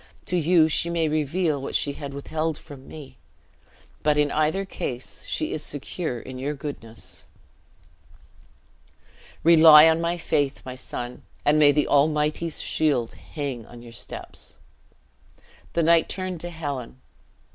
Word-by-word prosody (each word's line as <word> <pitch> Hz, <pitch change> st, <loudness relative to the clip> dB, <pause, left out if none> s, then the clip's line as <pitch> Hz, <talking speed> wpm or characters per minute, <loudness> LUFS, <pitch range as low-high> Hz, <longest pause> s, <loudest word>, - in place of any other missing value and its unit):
To 180 Hz, -, -1 dB
you 170 Hz, -1 st, +4 dB
she 165 Hz, +2 st, +2 dB
may 170 Hz, -2 st, +1 dB
reveal 155 Hz, 0 st, 0 dB
what -, -, -5 dB
she 145 Hz, -, +1 dB
had 140 Hz, -1 st, -7 dB
withheld 155 Hz, +2 st, -2 dB
from 140 Hz, -4 st, -13 dB
me; 135 Hz, -5 st, -11 dB, 0.8 s
but 150 Hz, -1 st, +2 dB
in 145 Hz, -1 st, +2 dB
either 155 Hz, +6 st, +1 dB
case, 125 Hz, -9 st, -5 dB
she 155 Hz, -, -2 dB
is 155 Hz, -, -2 dB
secure 145 Hz, -2 st, -3 dB
in 130 Hz, +2 st, -9 dB
your 145 Hz, +3 st, -2 dB
goodness." 135 Hz, -6 st, -7 dB, 2.2 s
"Rely 160 Hz, -1 st, +9 dB
on 160 Hz, +1 st, +3 dB
my 170 Hz, +1 st, 0 dB
faith, 145 Hz, -5 st, 0 dB
my 130 Hz, -, -6 dB
son; 125 Hz, -1 st, -7 dB, 0.2 s
and 150 Hz, +1 st, +4 dB
may 145 Hz, -1 st, +7 dB
the 150 Hz, 0 st, +1 dB
Almighty's 150 Hz, +2 st, +1 dB
shield 140 Hz, -7 st, +1 dB
hang 140 Hz, -6 st, -6 dB
on 120 Hz, 0 st, -12 dB
your 120 Hz, -1 st, -12 dB
steps!" 105 Hz, -, -8 dB, 1.2 s
The 170 Hz, -, +1 dB
knight 165 Hz, 0 st, +4 dB
turned 185 Hz, -2 st, -3 dB
to 175 Hz, -, -4 dB
Helen. 140 Hz, -7 st, -5 dB
150 Hz, 140 wpm, -25 LUFS, 140-160 Hz, 2.2 s, Rely